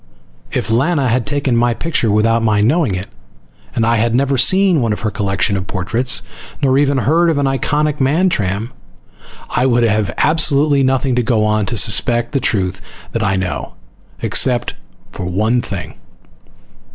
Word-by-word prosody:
If - - -2
Lana 135 +3 +1
had 125 +3 0
taken 145 -3 0
my 120 0 +2
picture 155 -7 -1
without 115 +2 +2
my 110 -2 +1
knowing 125 - +1
it 90 +1 -4 0.7
and 115 - +1
I 115 +1 +2
had 115 +1 +1
never 135 +1 +1
seen 185 +4 +3
one 115 -3 0
of - - -6
her 110 - -2
collection 100 0 -1
of 95 0 -4
portraits, 115 +7 -1 0.4
nor 135 -2 +2
ever 140 -1 +2
heard 165 +5 +2
of 160 - 0
an 140 - +1
iconic 150 +2 -1
Mantram, 130 - 0 0.8
I 125 - +1
would 120 -1 +2
have 105 -3 +1
absolutely 150 -2 +3
nothing 130 0 +1
to - - +3
go 115 -3 +1
on 105 -1 0
to 120 - -2
suspect 120 +3 +1
the 140 - 0
truth 95 -6 -1 0.3
that 115 - -2
I 100 -2 +1
know. 95 -1 -4 0.5
Except 120 -2 +1 0.4
for - - -6
one 110 +7 0
thing. - - -6
120 Hz, 165 wpm, -16 LUFS, 105-140 Hz, 0.8 s, seen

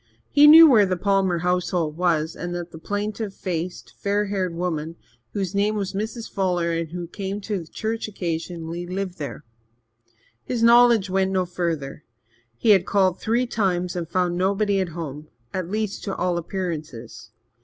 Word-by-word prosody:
He 295 +1 +7
knew 325 +2 +11
where 220 -8 +5
the 185 -1 -1
Palmer 195 -2 +1
homestead 175 -2 0
was, 165 -2 0
and 175 0 -5
that 175 0 -5
the 160 - -10
plaintive 205 +2 -3
faced, 175 -1 -5
fair 205 +1 0
haired 190 -4 -2
woman, 165 -2 -3 0.4
whose 195 -2 -2
name 205 +2 +1
was 200 -2 -3
Mrs. 220 +3 -4
Fuller 180 -3 0
and 165 -1 -2
who 175 +1 -5
came 195 +3 -5
to 195 -5 -4
church 220 +6 -3
occasionally, 170 -2 -4
lived 185 0 -4
there. 150 0 -6 1.0
His 235 -2 -2
knowledge 235 -4 +6
went 190 0 +2
no 190 -1 0
further. 165 -5 -3 0.5
He 220 - +3
had 190 -2 +4
called 190 -2 +2
three 235 +3 +1
times 180 -6 -1
and 170 -2 -4
found 175 0 0
nobody 200 +1 +1
at 185 -2 -1
home 150 -2 -6 0.3
at 185 -2 -3
least, 210 0 -3
to 195 - -3
all 175 -1 0
appearances. 160 - -6
185 Hz, 165 wpm, -23 LUFS, 170-205 Hz, 1.0 s, knew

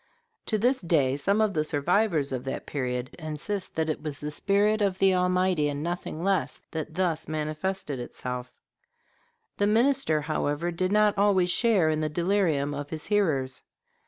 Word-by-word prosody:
To 215 - +1
this 250 +5 +2
day 145 -7 +2
some 200 +9 +1
of 215 -2 +2
the 155 - +1
survivors 155 0 +1
of 130 -1 -3
that 135 - -4
period 125 -1 -3
insist 160 +5 -4
that 160 0 0
it 155 - -2
was 150 -2 -6
the 150 0 -4
spirit 205 +7 +2
of 195 -2 +1
the 190 0 +4
Almighty, 180 -4 +2
and 145 +1 -4
nothing 170 -1 -4
less, 195 0 0
that 155 0 -5
thus 170 -4 0
manifested 155 0 -3
itself. 125 +1 -6 1.1
The 205 - +2
minister, 230 - +3
however, 150 +2 -1
did 185 +2 -1
not 210 0 +4
always 190 -3 +3
share 195 -8 +3
in 155 - 0
the 155 - 0
delirium 170 -4 +1
of 145 0 -5
his 155 -1 -5
hearers. 155 -11 0
165 Hz, 165 wpm, -27 LUFS, 150-195 Hz, 1.1 s, the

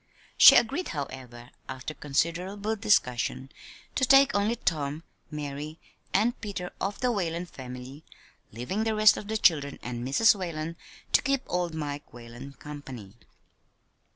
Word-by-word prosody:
She - - +10
agreed, 275 +10 +2
however, 130 -5 -7 0.2
after 130 +3 -6
considerable 175 +9 -1
discussion, 135 - +1 0.4
to 265 - -1
take 275 +1 +6
only 205 +3 +1
Tom, 155 -7 -2 0.3
Mary, 150 +1 -6 0.3
and 230 +6 +1
Peter 195 -4 -5
of 195 +1 -2
the 250 -1 +2
Whalen 175 -5 -2
family, 130 -1 -10 0.5
leaving 125 - -3
the 220 -1 0
rest 215 0 +6
of 205 - -7
the 220 +1 -1
children 145 -8 +2
and 120 0 -5
Mrs. 140 - +5
Whalen 170 -4 -5 0.4
to - - +5
keep 275 -2 0
old 175 -2 -2
Mike 145 -2 -5
Whalen 120 +3 -10
company. 135 -10 -10
160 Hz, 135 wpm, -27 LUFS, 135-205 Hz, 0.5 s, She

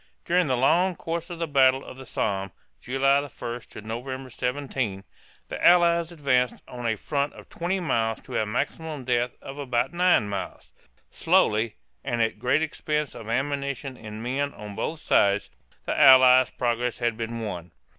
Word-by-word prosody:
During 180 -1 +2
the 130 -2 +1
long 175 +8 +3
course 170 +2 -4
of 175 - -6
the 165 - -1
Battle 135 -3 +3
of - - -10
the 130 -1 -11
Somme 100 -3 -2 0.3
(July 135 +2 +2
1 125 -4 -6
to - - -10
November 130 +4 -6
17) 125 -6 -3 0.4
the - - -6
Allies 170 -1 +5
advanced 130 -6 0
on 120 -1 -5
a 110 - +1
front 140 +5 -2
of - - -14
twenty 180 +3 -2
miles 115 -10 0
to - - -9
a 110 - -2
maximum 145 +4 -3
depth 120 0 0
of 135 +1 -8
about 125 0 -1
nine 175 - +3
miles. 100 -1 -6 0.4
Slowly, 110 +1 +2 0.3
and 120 - -2
at 115 -2 0
great 125 +6 +2
expense 150 -1 -2
of 110 - -10
ammunition 140 +1 -2
and 110 -1 -8
men 140 +3 -2
on 105 -1 -8
both 160 +8 -3
sides, 100 0 +2 0.3
the - - -1
Allied 130 -1 +7
progress 120 0 -1
had 120 -1 0
been 115 +1 -4
won. 90 -5 -6
130 Hz, 165 wpm, -25 LUFS, 115-145 Hz, 0.4 s, Allied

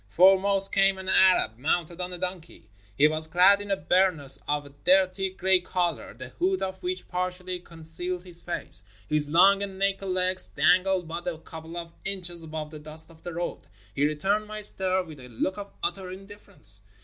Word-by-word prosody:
Foremost 195 - +4
came 195 -1 +4
an 190 0 -8
Arab 185 -13 +4
mounted 170 +4 -1
on 180 0 -4
a 180 - -5
donkey. 180 -2 -6 0.3
He 150 - +6
was 155 +1 +1
clad 185 +5 +5
in 205 - -8
a 195 - +1
burnous 160 -4 +3
of 145 0 -1
a - - -12
dirty 190 +1 +3
gray 190 0 +2
color, 175 - -3
the 130 +1 -9
hood 190 +7 -1
of 190 0 -5
which 365 +1 -4
partially 180 0 -4
con 165 -2 -15
cealed 175 +3 -3
his 175 -2 -2
face. 170 - 0 0.2
His 150 -1 +2
long 195 +5 +5
and 195 -1 -5
naked 195 0 0
legs 185 0 +2
dangled 185 0 +2
but 170 +2 -6
a 170 -2 -2
couple 160 +1 -10
of 170 -1 -7
inches 180 -3 -2
above 155 -1 -6
the 155 - -9
dust 155 +2 -7
of 160 -1 -19
the 175 - -7
road. 175 +1 -5 0.3
He 145 +5 +2
returned 195 +8 -1
my 215 0 -7
stare 190 -2 +3
with 155 -5 -12
a 125 -1 -12
look 185 - -3
of 200 0 -8
utter 190 -2 -2
indifference. 190 - -8
180 Hz, 195 wpm, -26 LUFS, 160-190 Hz, 0.3 s, He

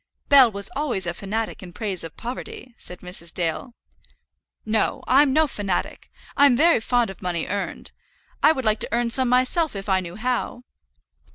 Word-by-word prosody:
"Bell 270 -5 +7
was 200 -1 0
always 260 -10 -2
a 170 - -2
fanatic 215 +5 -4
in 180 -2 -11
praise 200 -6 -3
of 165 -2 -9
poverty," 250 +1 -7
said 180 -6 -10
Mrs. 180 -2 -5
Dale. 175 +9 -3 0.9
"No; 220 0 0
I'm 275 +2 +5
no 315 +3 +4
fanatic. 205 -9 -4 0.3
I'm 280 -3 +5
very 330 +1 +5
fond 240 -1 0
of 195 - -14
money 175 -2 -2
earned. 200 +1 -4 0.5
I - - +6
would 265 -5 -3
like 215 0 +2
to - - -2
earn 235 +1 0
some 255 +1 +3
myself 255 +4 +1
if 195 +1 -6
I 190 -1 +2
knew 175 -1 -7
how." 245 +2 -3
225 Hz, 175 wpm, -23 LUFS, 190-255 Hz, 0.9 s, Bell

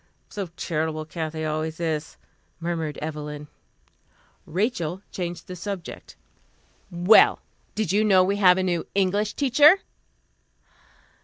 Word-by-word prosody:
"So 200 -3 -5
charitable, 155 -1 -2
Kathy 160 -1 -4
always 155 +1 -3
is," 160 -2 -3 0.4
murmured 165 -3 -3
Evelyn. 150 -1 -6 1.0
Rachel 185 -2 -2
changed 175 -2 -5
the 185 - -8
subject. 185 0 -7 0.7
"Well 180 +4 +5 0.4
did 215 -6 -1
you 210 +2 +3
know 190 -3 +5
we 200 +2 0
have 185 -3 +5
a 190 - 0
new 175 -2 -1
English 200 +2 +1
teacher?" 295 +7 +5
175 Hz, 110 wpm, -24 LUFS, 160-200 Hz, 1.0 s, Well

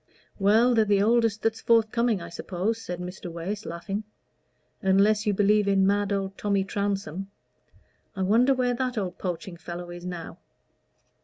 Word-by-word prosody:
"Well, 220 +5 +4
they're 225 -2 +4
the 200 -1 +2
oldest 225 -1 +2
that's 225 0 0
forthcoming, 230 -3 +2
I 170 - -8
suppose," 190 +6 -3
said 175 -4 -5
Mr. 180 0 -7
Wace, 190 +6 -5
laughing. 195 +5 -4 0.8
"Unless 205 +3 +3
you 205 - +3
believe 205 +1 +3
in 195 -1 +3
mad 205 +1 +1
old 195 -1 -2
Tommy 200 -2 +1
Trounsem. 195 -2 -3 0.9
I 190 - -1
wonder 240 +8 +4
where 250 -1 +1
that 250 0 -2
old 190 -3 -3
poaching 175 -1 -4
fellow 175 +1 -7
is 175 0 -9
now." 175 -2 -7
200 Hz, 155 wpm, -26 LUFS, 185-220 Hz, 0.9 s, Well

